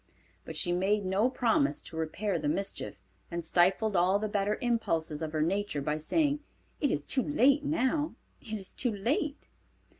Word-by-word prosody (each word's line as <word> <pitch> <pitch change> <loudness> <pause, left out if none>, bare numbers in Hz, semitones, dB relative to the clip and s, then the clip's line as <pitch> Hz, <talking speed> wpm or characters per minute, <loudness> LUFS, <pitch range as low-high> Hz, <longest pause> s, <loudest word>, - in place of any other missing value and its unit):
But - - -7
she 175 - +2
made 195 +3 +1
no 195 +6 +2
promise 270 +4 +2
to - - -10
repair 170 +4 -1
the 150 - -2
mischief, 195 +6 -3 0.3
and 170 -1 -4
stifled 190 +5 +3
all 185 +3 +4
the 215 +1 -2
better 205 0 0
impulses 165 -11 0
of 160 -1 -3
her 155 -1 +1
nature 195 -1 -1
by 150 +2 -1
saying, 290 - +1 0.4
"It 285 - +2
is 145 - -1
too 260 - +1
late 285 +1 +3
now: 295 +1 0 0.3
it 225 - -10
is 200 -3 -4
too 245 - 0
late." 280 +8 -1
205 Hz, 175 wpm, -30 LUFS, 170-255 Hz, 0.4 s, all